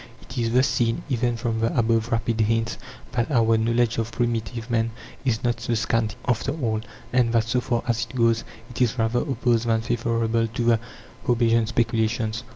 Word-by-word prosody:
It - - -12
is 115 -1 0
thus 130 +3 +4
seen, 115 -3 0
even 120 -2 0
from 115 -1 -2
the 115 +2 0
above 115 0 +2
rapid 115 -1 0
hints, 115 +1 0 0.3
that 120 -1 0
our 115 -5 +3
knowledge 115 +1 +1
of 115 0 -2
primitive 115 -1 -2
man 115 0 +2 0.4
is 115 -4 0
not 120 -1 0
so 115 +1 -1
scanty 110 0 0
after 125 +3 0
all, 110 -5 0 0.3
and 125 -2 +3
that, 115 -1 +4
so 120 +2 0
far 120 -2 -1
as 115 -1 0
it - - -11
goes, 115 -2 +3 0.3
it 125 - -5
is 125 -1 +2
rather 115 +1 +1
opposed 120 -4 0
than 110 -1 +2
favourable 115 0 0
to 115 +2 -3
the 115 -1 +4 0.5
Hobbesian 115 -2 +3
speculations. 115 -1 0
115 Hz, 185 wpm, -24 LUFS, 115-120 Hz, 0.5 s, thus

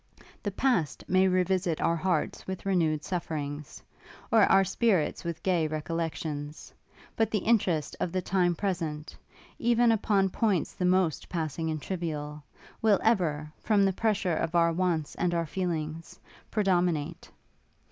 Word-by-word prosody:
The 205 - -2
past 195 - 0
may 185 +1 +4
re 185 0 +3
visit 180 -3 0
our 170 - +2
hearts 170 -1 -1
with 190 0 -5
renewed 160 -6 +1
sufferings, 150 -5 -5 0.5
or - - +6
our 195 - +5
spirits 195 -4 +1
with 170 -1 -5
gay 175 -4 +2
recollections; 155 -1 -4 0.4
but 225 -2 +1
the 220 - 0
interest 185 -9 +1
of 175 - -1
the 185 - 0
time 175 -2 +1
present, 165 -5 -3 0.4
even 240 0 +4
upon 200 -3 +2
points 200 -7 0
the 180 - -2
most 180 -3 +1
passing 160 -1 -2
and 155 -1 -2
trivial, 150 -4 -4 0.4
will 215 -3 +4
ever, 155 -9 +1
from 205 -2 +3
the 195 - +2
pressure 200 -4 0
of 165 +2 -2
our 170 -1 +4
wants 170 -4 0
and 175 -1 0
our 170 0 0
feelings, 165 -2 -4 0.3
predominate. 180 -7 0
175 Hz, 145 wpm, -28 LUFS, 155-190 Hz, 0.5 s, or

